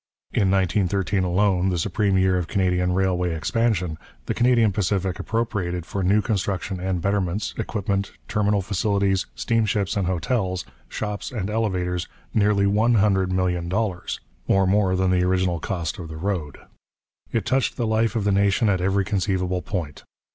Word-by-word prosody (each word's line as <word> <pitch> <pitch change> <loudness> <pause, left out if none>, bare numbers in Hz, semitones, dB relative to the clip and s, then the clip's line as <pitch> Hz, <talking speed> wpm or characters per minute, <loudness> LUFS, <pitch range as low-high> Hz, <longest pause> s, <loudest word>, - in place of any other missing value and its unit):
In 95 - +2
1913 95 0 +1
alone, 95 0 +2
the 90 - 0
supreme 100 +2 +1
year 95 0 +3
of 90 -2 -1
Canadian 90 -1 +1
railway 90 -2 +1
expansion, 90 -2 0 0.3
the - - -1
Canadian 120 -3 +3
Pacific 95 -2 -1
appropriated 100 -7 -2
for 100 - -3
new 100 +3 +3
construction 95 -3 -2
and 90 -2 -2
betterments, 100 0 -1
equipment, 100 -2 -2 0.2
terminal 105 -1 +1
facilities, 100 -1 0
steamships 105 -4 0
and 100 -3 0
hotels, 95 +1 -1 0.2
shops 105 -1 -4
and 105 -5 -3
elevators, 90 -6 -1 0.3
nearly 105 -2 +3
one 110 +4 +3
hundred 95 -3 +2
million 90 -2 0
dollars, 95 -2 -2 0.3
or 95 0 +3
more 95 -1 +2
than 95 0 +2
the 90 -1 +3
original 90 -2 +1
cost 85 0 -3
of 85 - -6
the 80 0 -8
road. 85 -5 -3 0.7
It 115 -4 -1
touched 130 0 +1
the 120 - 0
life 110 +1 +1
of 110 - 0
the 100 - +2
nation 100 +2 +3
at 95 -3 +1
every 95 +1 +1
conceivable 95 -2 0
point. 85 -8 -5
95 Hz, 155 wpm, -23 LUFS, 90-105 Hz, 0.7 s, year